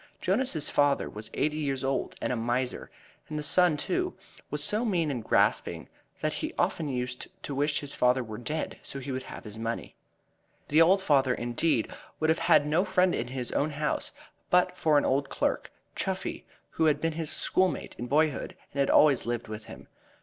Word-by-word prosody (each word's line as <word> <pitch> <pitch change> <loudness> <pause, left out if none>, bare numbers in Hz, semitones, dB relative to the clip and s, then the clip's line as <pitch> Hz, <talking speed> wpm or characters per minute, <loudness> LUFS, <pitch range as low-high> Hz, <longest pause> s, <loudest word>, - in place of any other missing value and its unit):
Jonas's 190 - +1
father 145 -1 +2
was 105 +1 -5
eighty 150 +2 0
years 140 -3 -1
old 135 0 -1
and - - 0
a - - 0
miser, 120 +2 -2 0.4
and 155 - -4
the 150 - -3
son, 175 0 +4
too, 360 - -1 0.3
was - - 0
so 215 +3 +2
mean 175 -9 +1
and 120 -4 -3
grasping - - +1 0.3
that - - 0
he - - -4
often 160 - 0
used 125 -1 -3 0.2
to 145 - -4
wish 145 +1 0
his 145 -1 -5
father 125 +1 +3
were 110 -2 -7
dead 150 +6 -4
so - - -6
he 135 +1 -5
would 130 0 -2
have - - -9
his 110 0 -8
money. 115 +1 -4 0.8
The 155 +3 +5
old 190 +4 +5
father, 135 -6 +3
indeed, 120 +1 0 0.3
would 155 0 +3
have 160 - +1
had 145 - +5
no 155 +5 +2
friend 185 -2 +2
in 120 - -2
his 125 -1 -4
own 150 - +1
house 150 0 -2 0.4
but 180 0 +3
for 155 -4 +3
an - - +3
old 140 +1 +1
clerk, - - -1 0.2
Chuffey, - - -3 0.3
who 160 - +1
had 155 -2 +3
been 165 -1 0
his 160 -1 -4
schoolmate 185 -1 0
in 120 - -4
boyhood 150 +2 +1 0.2
and 140 - -4
had 140 - +3
always 140 -6 +5
lived 120 -1 -2
with 110 0 -7
him. - - -11
145 Hz, 195 wpm, -28 LUFS, 125-160 Hz, 0.8 s, The